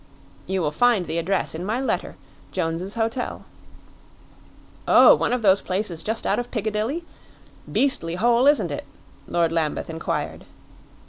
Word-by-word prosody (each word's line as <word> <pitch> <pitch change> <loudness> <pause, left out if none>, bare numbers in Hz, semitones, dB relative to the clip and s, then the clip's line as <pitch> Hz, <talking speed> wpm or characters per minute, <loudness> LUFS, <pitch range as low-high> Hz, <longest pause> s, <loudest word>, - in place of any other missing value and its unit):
"You 190 -1 -1
will 150 - 0
find 225 +2 +3
the 170 - -2
address 190 +3 -1
in 160 +2 -5
my 215 +6 -1
letter 265 - -2 0.4
Jones's 170 +5 -3
Hotel." 230 +2 -2 1.4
"Oh, - - +8
one - - 0
of 250 -2 -1
those 195 -1 +5
places 185 -3 -2
just 220 +4 -3
out - - +1
of 245 0 -4
Piccadilly? 220 - -2 0.7
Beastly 260 -12 +1
hole, 235 +6 +3
isn't 290 0 +3
it?" - - -5 0.4
Lord 170 -1 +1
Lambeth 165 -1 -1
inquired. 160 0 -4
205 Hz, 140 wpm, -23 LUFS, 170-240 Hz, 1.4 s, Oh